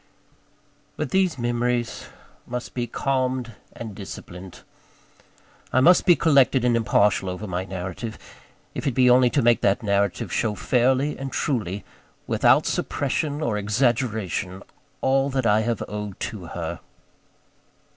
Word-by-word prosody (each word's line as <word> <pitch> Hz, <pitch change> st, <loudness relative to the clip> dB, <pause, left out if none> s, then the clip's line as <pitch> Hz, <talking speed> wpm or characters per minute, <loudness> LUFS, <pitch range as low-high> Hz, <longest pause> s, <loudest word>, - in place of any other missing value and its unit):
But -, -, -3 dB
these 190 Hz, -4 st, +2 dB
memories 120 Hz, 0 st, -1 dB, 0.4 s
must 125 Hz, 0 st, -5 dB
be 120 Hz, -1 st, -2 dB
calmed 130 Hz, -1 st, -1 dB, 0.2 s
and 110 Hz, -3 st, -8 dB
disciplined. 95 Hz, -2 st, -9 dB, 1.1 s
I -, -, +3 dB
must 175 Hz, +8 st, +5 dB
be 175 Hz, -, +7 dB
collected 135 Hz, -6 st, +3 dB
and 120 Hz, -1 st, +3 dB
impartial 105 Hz, -4 st, +2 dB
over 90 Hz, +4 st, -5 dB
my 90 Hz, -1 st, -3 dB
narrative 95 Hz, +4 st, -6 dB, 0.6 s
if -, -, -4 dB
it 135 Hz, -, +1 dB
be 125 Hz, -1 st, +5 dB
only 125 Hz, 0 st, +5 dB
to 140 Hz, +1 st, +1 dB
make 120 Hz, 0 st, +4 dB
that 100 Hz, +3 st, +2 dB
narrative 100 Hz, -3 st, 0 dB
show 110 Hz, -2 st, 0 dB
fairly 130 Hz, +6 st, +1 dB
and 135 Hz, -1 st, -5 dB
truly, 105 Hz, -8 st, -2 dB, 0.4 s
without -, -, +3 dB
suppression 145 Hz, +2 st, -1 dB
or 105 Hz, -5 st, 0 dB
exaggeration, 105 Hz, -4 st, -1 dB, 0.4 s
all 135 Hz, +1 st, +2 dB
that 130 Hz, -2 st, -1 dB
I 105 Hz, 0 st, +4 dB
have 115 Hz, 0 st, -1 dB
owed 105 Hz, -2 st, -6 dB
to -, -, -9 dB
her. -, -, -5 dB
120 Hz, 135 wpm, -24 LUFS, 105-130 Hz, 1.1 s, be